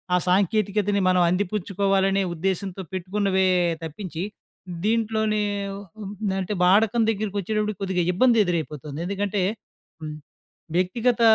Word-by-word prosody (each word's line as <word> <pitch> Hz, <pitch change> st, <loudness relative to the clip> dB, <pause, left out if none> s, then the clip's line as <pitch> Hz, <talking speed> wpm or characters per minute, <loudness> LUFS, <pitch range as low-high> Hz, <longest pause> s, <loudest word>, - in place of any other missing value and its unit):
ఆ -, -, +5 dB
సాంకేతికతను 200 Hz, +1 st, +2 dB
మనం 180 Hz, -1 st, +4 dB
అందిపుచ్చుకోవాలనే 195 Hz, 0 st, +1 dB
ఉద్దేశ్యంతో 190 Hz, +2 st, -2 dB
పెట్టుకున్నవే 190 Hz, +1 st, +1 dB, 0.4 s
తప్పించి. 165 Hz, +1 st, -5 dB, 0.6 s
దీంట్లోనే 220 Hz, -1 st, +1 dB, 1.0 s
అంటే, 195 Hz, +3 st, -3 dB
వాడకం 220 Hz, +5 st, +4 dB
దగ్గరికి 205 Hz, -1 st, -3 dB
వచ్చేటప్పటికి 215 Hz, 0 st, -2 dB
కొద్దిగా 185 Hz, -2 st, 0 dB
ఇబ్బంది 235 Hz, +3 st, +4 dB
ఎదురైపోతుంది. 155 Hz, -4 st, -3 dB
ఎందుకంటే 200 Hz, 0 st, -1 dB, 1.3 s
వ్యక్తిగత 230 Hz, +7 st, +1 dB
195 Hz, 90 wpm, -24 LUFS, 185-215 Hz, 1.3 s, ఆ